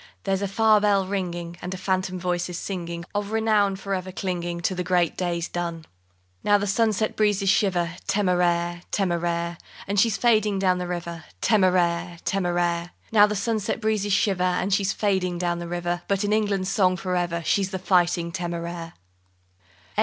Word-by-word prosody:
There's 195 -1 0
a 200 - 0
far 215 +1 +4
bell 200 -2 +3
ringing, 175 -3 -4
And 185 +1 -4
a - - -6
phantom 185 -1 -1
voice 175 0 -1
is 175 - -5
singing 170 -3 -5
Of 205 0 -2
renown 215 -3 +2
for 195 +1 -4
ever 185 0 -3
clinging 175 -2 -3
To 180 - 0
the 180 0 -2
great 175 -2 +1
days 175 -1 -2
done. 170 -2 -4 0.6
_Now 205 0 +4
the 205 - -1
sunset 215 +1 +1
breezes 205 -2 +2
shiver, 180 -4 +2 0.2
Téméraire! 175 -3 +1
Téméraire! 170 -2 -1 0.3
And 200 +1 +1
she's 220 0 +3
fading 215 -4 +3
down 185 -1 +2
the 180 - -3
river, 170 -2 -5
Téméraire! 175 - +2
Téméraire! 175 -2 0 0.2
Now 210 -2 +7
the 210 - -2
sunset 210 +1 -1
breezes 215 -2 0
shiver, 195 -1 +2
And 185 +2 +1
she's 195 0 +2
fading 190 -5 0
down 175 -1 -1
the 170 - -5
river, 175 0 -2
But 200 0 +1
in 205 +1 +1
England's 200 -3 0
song 185 -3 +3
for 180 +1 -2
ever 170 -1 -1
She's 195 -1 +1
the 190 - -3
Fighting 175 -2 +2
Téméraire. 170 -1 -4
185 Hz, 170 wpm, -25 LUFS, 175-200 Hz, 0.6 s, Now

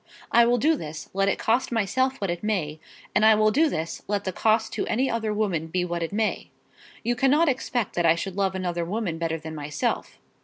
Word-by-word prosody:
I 235 0 +6
will 245 +1 +3
do 315 +7 +3
this, 155 - -8
let 195 +1 +2
it - - 0
cost 235 +4 +1
myself 260 +5 0
what 195 -3 -1
it 175 - -4
may; 165 -8 -1 0.3
and 210 - +3
I 220 0 +7
will 215 0 +3
do 310 +7 +3
this 165 - -4
let 205 -1 -1
the 190 - -2
cost 220 +3 +1
to - - -2
any 260 +4 +1
other 225 -2 -1
woman 195 -7 -1
be 180 +2 -1
what 175 -1 -3
it 165 - -2
may. 215 +1 -1 0.5
You 240 +2 0
cannot 275 +7 +3
expect 250 -5 -1
that 175 - 0
I 165 - +5
should 185 +2 -5
love 195 -1 0
another 175 -2 -2
woman 180 -2 -3
better 165 -1 -1
than 160 0 -8
myself." 150 -1 -3
205 Hz, 225 wpm, -25 LUFS, 170-230 Hz, 0.5 s, I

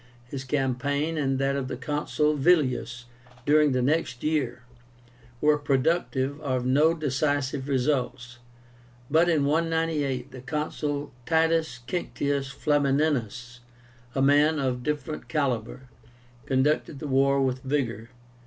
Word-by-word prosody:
His 130 +1 -6
campaign, 140 +3 -1
and 135 -3 0
that 135 +1 0
of 135 -2 -2
the - - -5
Consul 150 +2 0
Villius 130 -6 +1 0.4
during 150 0 +4
the 130 -1 +1
next 130 -3 0
year, 135 -6 -1 0.8
were 150 +1 +3
productive 140 0 0
of 130 -4 -1
no 150 +6 +4
decisive 145 -2 -1
results, 125 -3 -1 0.7
but 165 +3 +4
in 155 -4 +2
198 155 -4 0
the 130 -1 -9
Consul 145 0 -3
TITUS 160 -5 +1
QUINCTIUS 140 -5 -2
FLAMINÍNUS, 140 -5 0 0.6
a 135 - +2
man 145 +3 +4
of 130 -3 -1
different 150 +3 -4
calibre, 130 -6 -1 0.7
conducted 140 +2 +1
the 150 - -6
war 140 0 +3
with 130 -1 0
vigor. 125 -5 -2
140 Hz, 115 wpm, -26 LUFS, 130-150 Hz, 0.8 s, during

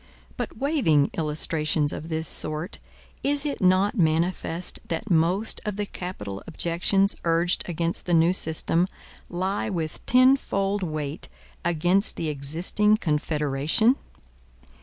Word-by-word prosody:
But - - -5
waiving 260 - +2
illustrations 155 -1 0
of 160 - -7
this 160 0 -1
sort, 155 +4 0 0.4
is 285 +1 0
it 285 - -3
not 185 +4 +3
manifest 165 +1 +1
that 170 +5 -4
most 175 +6 +1
of 210 -2 -3
the 205 0 -2
capital 105 - -6
objections 175 +4 +1
urged 170 +1 +1
against 170 +1 -2
the 175 - +1
new 165 +2 +4
system 165 0 +1 0.4
lie 190 +4 -2
with 165 -5 -4
tenfold 245 -6 +3
weight 155 -3 -4 0.3
against 175 +4 +1
the 160 - -3
existing 165 +9 +2
Confederation? 150 - +1
170 Hz, 115 wpm, -25 LUFS, 155-195 Hz, 0.4 s, new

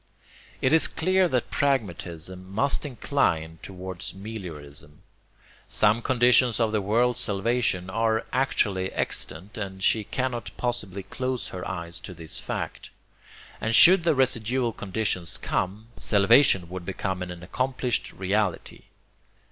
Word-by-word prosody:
It 130 - +3
is 160 - +6
clear 185 +2 +2
that 125 -7 -1
pragmatism 95 - -2
must 140 +8 +1
incline 80 - -1
towards 95 -2 -7
meliorism. 80 -9 -9 0.6
Some 110 +2 +3
conditions 125 -1 +4
of 115 -2 +2
the 110 -1 +1
world's 120 +5 +2
salvation 105 -3 0
are 110 +3 0
actually 100 -8 +1
extant, 95 +8 -3
and 95 -2 -5
she 110 +2 +3
cannot 125 +2 -3
possibly 105 -6 -3
close 130 +5 -3
her 90 -1 -6
eyes 85 -1 -5
to 90 - -9
this 80 -1 -6
fact: - - -5 0.7
and 115 0 +1
should 180 - +8
the 165 -3 +3
residual 125 -2 +1
conditions 100 -4 -2
come, 100 +5 -3
salvation 100 -2 +4
would 90 +1 -7
become 95 0 -3
an 90 -1 -6
accomplished 125 +4 -1
reality. 95 -1 -2
105 Hz, 125 wpm, -26 LUFS, 95-125 Hz, 0.7 s, should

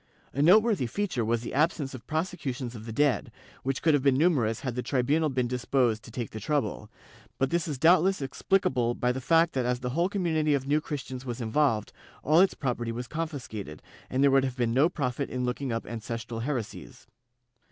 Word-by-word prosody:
A 140 - 0
noteworthy 200 - +5
feature 180 - -2
was 115 +1 0
the - - -6
absence 145 -1 +1
of 130 - -10
prosecutions 150 -7 -3
of 110 -1 -9
the - - -5
dead, 145 +3 +1 0.3
which 135 0 -2
could 160 - +4
have 145 - +3
been 135 -1 +3
numerous 135 -9 +2
had 130 -3 -3
the 125 - -2
tribunal 145 +5 +1
been 130 -2 0
disposed 120 -2 +1
to - - -13
take 115 -1 -5
the 110 - -6
trouble, 145 -6 -2 0.5
but 135 +2 0
this 170 -1 0
is 150 -4 -3
doubtless 180 +6 +4
explicable 130 -4 0
by 125 - +1
the 130 +1 -4
fact 165 +5 +3
that 130 -2 0
as 125 0 -1
the 125 0 -3
whole 170 +7 +1
community 160 -6 +1
of 135 -1 -2
New 150 +2 +2
Christians 130 -4 -6
was 120 -2 -5
involved, 115 -1 +1 0.3
all 155 +4 +4
its 190 +1 +4
property 120 -4 -2
was 120 +1 -5
confiscated, 125 - -5 0.3
and 130 +2 +1
there 140 - +5
would 135 0 +4
have 130 -1 -3
been 120 -2 +1
no 140 +7 +4
profit 140 -4 -2
in 125 -1 -2
looking 125 +1 -2
up 115 0 -3
ancestral 115 +1 -5
heresies. 115 - -5
130 Hz, 205 wpm, -28 LUFS, 120-155 Hz, 0.5 s, noteworthy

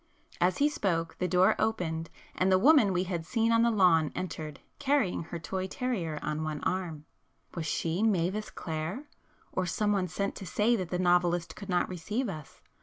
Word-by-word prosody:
As 180 +1 +2
he 290 - +4
spoke 170 - -1
the 180 - +1
door 180 +1 +4
opened, 165 -7 -1 0.2
and 185 +1 +1
the 185 - +6
woman 265 -1 +6
we 180 0 +1
had 175 -3 -3
seen 230 +5 +1
on 230 0 +4
the 235 - +4
lawn 180 -8 +4
entered, 155 -5 -5 0.2
carrying 275 - +1
her 170 - -6
toy 185 +4 -3
terrier 190 - -2
on 150 +1 -2
one 155 -1 -3
arm. 170 -5 -2 0.5
Was 165 -2 -4
she 165 +4 -1
Mavis 205 -1 +1
Clare? 160 - -4 0.5
or 185 -1 -1
some 210 +5 0
one 195 -3 +1
sent 200 +3 -2
to 195 - -7
say 215 +8 +2
that 185 -6 -3
the 180 - -1
novelist 175 -2 +2
could 200 -1 -9
not 180 -1 +2
receive 210 +8 -3
us? 155 -6 -9
180 Hz, 185 wpm, -29 LUFS, 165-210 Hz, 0.5 s, the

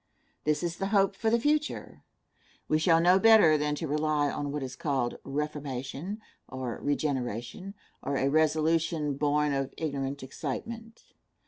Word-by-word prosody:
This 150 +2 +1
is 170 -1 -2
the 195 - -2
hope 195 -1 +2
for 220 - 0
the 235 +1 +3
future. 300 +4 -1 0.7
We 155 - +2
shall 165 +1 +4
know 180 +3 +5
better 220 -7 +7
than 150 0 0
to 160 +2 -4
rely 150 -1 +1
on 145 -1 -3
what 145 -1 -3
is 130 -1 -6
called 130 -3 -1
reformation, 145 - -4 0.3
or 130 -3 -5
regeneration, 140 - -2 0.3
or 140 0 -2
a 135 - +1
resolution 155 0 +2
born 150 +1 +1
of 135 0 -2
ignorant 140 -3 -3
excitement. 225 - -6
150 Hz, 145 wpm, -29 LUFS, 140-175 Hz, 0.7 s, better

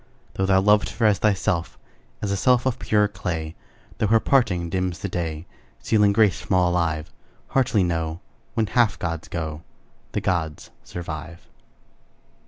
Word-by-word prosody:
Though 95 - -1
thou 95 0 +5
loved 105 +1 +4
her 115 - -1
as 105 -3 +4
thyself, 95 -5 0 0.5
As 100 - -1
a - - +1
self 125 +4 +3
of 130 -1 0
purer 105 -3 +2
clay, 85 -5 -4 0.5
Though 110 - +2
her 110 +2 +5
parting 100 -11 +2
dims 90 0 -2
the 100 - -4
day, 80 -3 -3 0.3
Stealing 105 -2 +3
grace 105 -2 +3
from 95 - -1
all 90 -1 +3
alive; 80 -3 -1 0.4
Heartily 125 -7 +2
know, 80 -1 -2 0.4
When 110 - +2
half 110 +3 +2
gods 85 -1 -4
go, 80 -2 -4 0.5
The - - 0
gods 80 -4 -2
survive. 85 0 -7
90 Hz, 155 wpm, -24 LUFS, 85-105 Hz, 0.5 s, thou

